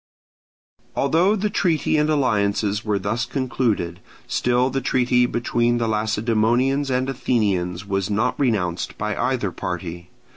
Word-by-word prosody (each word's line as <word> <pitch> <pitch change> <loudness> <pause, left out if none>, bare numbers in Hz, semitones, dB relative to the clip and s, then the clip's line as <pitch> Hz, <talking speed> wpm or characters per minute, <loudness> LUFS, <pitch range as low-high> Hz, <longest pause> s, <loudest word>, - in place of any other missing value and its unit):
Although 165 +9 +3
the 210 0 -1
treaty 165 -6 +1
and 150 0 +2
alliances 105 -7 +1
were 105 -2 0
thus 100 +5 -1
concluded, 120 - -1 0.3
still 125 +1 +1
the 135 - -1
treaty 125 -1 +2
between 120 0 0
the 115 -1 0
Lacedaemonians 115 +5 +1
and 130 0 0
Athenians 100 -8 -1
was 95 -1 -1
not 110 +5 +1
renounced 95 -10 -1
by 105 0 -2
either 125 -6 -1
party. 85 -1 -5
120 Hz, 125 wpm, -22 LUFS, 100-130 Hz, 0.3 s, Although